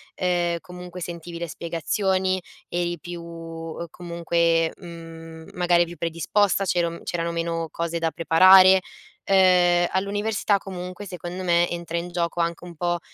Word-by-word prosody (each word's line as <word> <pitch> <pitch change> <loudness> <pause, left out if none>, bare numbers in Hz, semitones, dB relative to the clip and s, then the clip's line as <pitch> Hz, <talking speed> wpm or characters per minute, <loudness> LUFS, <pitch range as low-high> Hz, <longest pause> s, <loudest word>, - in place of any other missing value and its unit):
ehm, 175 -2 0
comunque 180 0 -9
sentivi 170 0 -6
le 170 -2 -4
spiegazioni, 185 +4 -1 0.3
eri 175 0 -1
più, 175 0 -7
uhm, 165 0 -7
comunque, 170 -1 0
mhmm, 165 -2 -10
magari 175 -1 +3
più 175 0 -8
predisposta, 170 +5 +1
c'era 170 -3 0
c'erano 170 0 -2
meno 165 -1 -2
cose 170 +1 -3
da 165 -1 0
preparare. 185 +3 +7 0.5
Ehm, 180 -2 +5
all'università 205 +1 0
comunque 185 0 -7
secondo 180 -1 -6
me 175 -1 +3
entra 170 -1 -4
in 175 +1 -4
gioco 175 0 -2
anche 170 0 -1
un 175 -1 -10
po' 175 +1 -1
175 Hz, 135 wpm, -24 LUFS, 170-180 Hz, 0.5 s, preparare